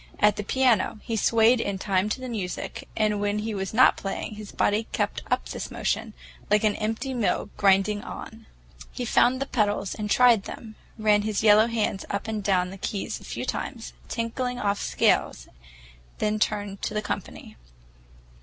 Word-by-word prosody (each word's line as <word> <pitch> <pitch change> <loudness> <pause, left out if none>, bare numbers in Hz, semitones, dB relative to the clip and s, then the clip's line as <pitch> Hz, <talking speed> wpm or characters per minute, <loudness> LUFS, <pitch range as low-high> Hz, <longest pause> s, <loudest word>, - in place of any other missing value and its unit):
At 210 -1 +4
the 210 - -4
piano, 250 -1 +2
he 230 - -3
swayed 230 +2 +4
in 200 -3 -2
time 190 +1 0
to 235 - -2
the 255 - -6
music, 205 -7 -5
and 210 -2 +1
when 205 0 0
he 215 +1 -3
was 195 -1 -3
not 250 +4 +5
playing, 195 +2 -4
his 210 -1 -9
body 215 +2 +1
kept - - -1
up - - 0
this - - -5
motion, - - -2 0.3
like 210 +1 +3
an 215 -1 +2
empty 225 +5 -2
mill 235 -5 -1
grinding 200 +1 +3
on. 220 0 -9 0.4
He 250 - -4
found 250 +2 +3
the 275 - -1
pedals 205 -6 0
and 210 -1 -4
tried 235 -3 +5
them, 220 -2 -8 0.2
ran 210 -1 +3
his 215 0 -1
yellow 215 +1 +6
hands 220 -4 -1
up 200 +2 -3
and 215 -2 -3
down 185 -2 +1
the 195 - -10
keys 200 +1 -3
a - - -15
few - - -5
times, - - -4 0.2
tinkling 245 +2 -2
off 200 -4 -1
scales, - - +1 0.7
then 215 0 0
turned 205 -2 -1
to 215 - -3
the 210 - -1
company. - - -6
210 Hz, 180 wpm, -26 LUFS, 200-225 Hz, 0.7 s, yellow